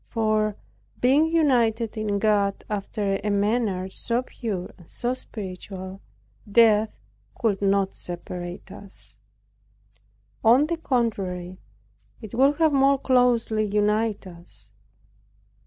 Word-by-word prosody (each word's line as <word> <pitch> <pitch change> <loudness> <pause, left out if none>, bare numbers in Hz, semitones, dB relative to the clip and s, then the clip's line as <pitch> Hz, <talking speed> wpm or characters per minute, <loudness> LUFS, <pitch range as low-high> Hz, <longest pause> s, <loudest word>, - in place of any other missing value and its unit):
For, 215 -2 +1 0.4
being 275 +6 +4
united 240 -9 +2
in 215 -2 -1
God 200 -1 +1
after 200 -1 -2
a 210 - 0
manner 205 -2 0
so 235 +5 -2
pure, 205 -8 -5
and 175 - -17
so 245 +1 -1
spiritual, 190 -4 -8 0.5
death 220 -1 +4 0.4
could 215 -5 0
not 195 -1 +2
separate 175 +1 -7
us. 200 0 -9 1.3
On 245 +6 +6
the 335 +2 -2
contrary 195 - -2 0.6
it 220 -4 -10
would 270 +4 +4
have 320 -2 +3
more 275 0 +4
closely 245 -4 +2
united 210 +1 0
us. 170 - -13
215 Hz, 105 wpm, -25 LUFS, 195-240 Hz, 1.3 s, On